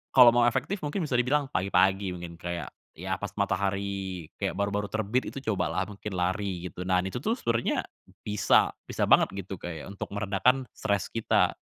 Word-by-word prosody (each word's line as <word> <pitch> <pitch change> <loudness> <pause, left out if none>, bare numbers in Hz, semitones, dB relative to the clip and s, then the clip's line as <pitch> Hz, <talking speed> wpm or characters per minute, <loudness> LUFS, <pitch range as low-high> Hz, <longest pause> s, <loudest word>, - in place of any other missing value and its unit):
kalau 125 -2 +10
mau 120 0 +4
efektif 135 - 0
mungkin 150 +5 -1
bisa 140 -5 -1
dibilang 135 +2 +1
pagi-pagi 95 0 +2
mungkin, 85 -1 -8
kayak 85 -5 -4 0.2
ya, - - -3
pas - - -5
matahari, 95 -3 -2
kayak - - -1
baru-baru 100 +1 0
terbit, 110 +4 -1
itu 135 - -6
cobalah 95 -2 0
mungkin 105 0 -7
lari 90 0 -1
gitu. 90 +2 -7
Nah, 90 0 +3
ini 95 - -3
itu 95 - -5
tuh 220 - 0
sebenernya 115 - 0 0.4
bisa 105 -1 +3 0.2
bisa - - -1
banget - - +5
gitu 95 0 -5
kayak 85 -2 -6
untuk 100 - -6
meredakan 105 +6 +2
stres 100 -3 0
kita. 105 -5 +2
100 Hz, 175 wpm, -28 LUFS, 90-115 Hz, 0.4 s, kalau